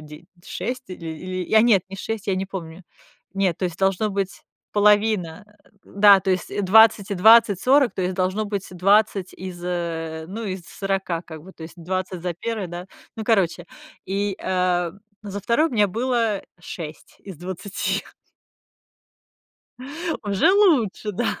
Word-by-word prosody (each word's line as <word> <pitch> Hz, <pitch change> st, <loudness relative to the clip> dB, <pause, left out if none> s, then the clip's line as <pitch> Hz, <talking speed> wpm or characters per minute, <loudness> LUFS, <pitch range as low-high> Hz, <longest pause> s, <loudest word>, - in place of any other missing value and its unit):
де 150 Hz, +2 st, -12 dB, 0.2 s
6 255 Hz, +1 st, -5 dB
или 170 Hz, -2 st, -8 dB
или, 185 Hz, +3 st, -5 dB
я 220 Hz, -, +5 dB
нет, 210 Hz, -6 st, +4 dB
не 195 Hz, -, -8 dB
6, 220 Hz, +1 st, -5 dB
я 195 Hz, -, +1 dB
не 190 Hz, -, -2 dB
помню. 180 Hz, -2 st, -8 dB, 0.5 s
Нет, 190 Hz, -4 st, +1 dB
то -, -, -2 dB
есть 175 Hz, 0 st, -7 dB
должно 195 Hz, +2 st, +1 dB
быть 195 Hz, -1 st, -3 dB, 0.3 s
половина, 205 Hz, -4 st, +2 dB, 0.4 s
да, 200 Hz, -1 st, +6 dB
то 190 Hz, 0 st, -1 dB
есть 185 Hz, +2 st, -1 dB
20 210 Hz, 0 st, +5 dB
и -, -, 0 dB
20, 210 Hz, 0 st, +6 dB
40, 270 Hz, -1 st, +3 dB
то 185 Hz, -, -2 dB
есть 185 Hz, +1 st, -1 dB
должно 190 Hz, +3 st, 0 dB
быть 200 Hz, -2 st, -4 dB
20 195 Hz, +1 st, +2 dB
из, 180 Hz, -1 st, -8 dB
э, 165 Hz, -2 st, -3 dB
ну, 225 Hz, +4 st, -6 dB
из 190 Hz, -3 st, -4 dB
40, 190 Hz, -1 st, -3 dB
как 160 Hz, -3 st, -11 dB
бы, 190 Hz, -, -13 dB
то 160 Hz, -, -13 dB
есть 160 Hz, -, -9 dB
20 185 Hz, +1 st, -4 dB
за 175 Hz, -2 st, -2 dB
первое, 215 Hz, +1 st, -4 dB
да, 175 Hz, +2 st, -7 dB, 0.3 s
ну, 220 Hz, -, -4 dB
короче. 185 Hz, -6 st, +1 dB, 0.4 s
И, 200 Hz, 0 st, -2 dB
э, 180 Hz, -2 st, 0 dB, 0.3 s
за 200 Hz, 0 st, -6 dB
2 235 Hz, +10 st, +2 dB
у -, -, -13 dB
меня 210 Hz, -4 st, +3 dB
было 230 Hz, -1 st, 0 dB, 0.2 s
6 155 Hz, -3 st, -9 dB
из 190 Hz, -5 st, -10 dB
20. 185 Hz, +3 st, -3 dB, 2.2 s
Уже 200 Hz, -, +2 dB
лучше, 275 Hz, -, +3 dB
да. 230 Hz, +5 st, -2 dB
190 Hz, 160 wpm, -23 LUFS, 180-210 Hz, 2.2 s, да